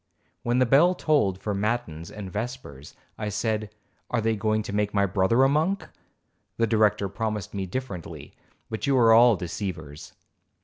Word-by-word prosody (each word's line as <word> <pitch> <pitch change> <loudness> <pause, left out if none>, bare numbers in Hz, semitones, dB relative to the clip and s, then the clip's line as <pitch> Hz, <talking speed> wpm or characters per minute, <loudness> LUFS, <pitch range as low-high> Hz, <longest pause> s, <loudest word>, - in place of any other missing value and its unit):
When 120 +1 0
the 130 - +4
bell 155 +9 +5
tolled 140 - +1
for 105 - -3
matins 100 -6 -2
and 100 -3 -8
vespers, 105 - -6 0.2
I 105 -1 -2
said, 110 0 -2 0.4
'Are 120 - 0
they 110 0 +1
going 110 +1 0
to 100 - -6
make 105 0 -1
my 100 0 +3
brother 100 +6 +2
a - - +6
monk? 160 +8 0 0.7
The 115 - +3
Director 105 -2 +2
promised 105 0 -4
me 95 -2 -3
differently, 95 -5 -6 0.3
but 110 +5 -4
you 135 -1 +3
are 115 -2 +6
all 120 0 +7
deceivers.' 85 -5 -6
110 Hz, 165 wpm, -25 LUFS, 100-120 Hz, 0.7 s, all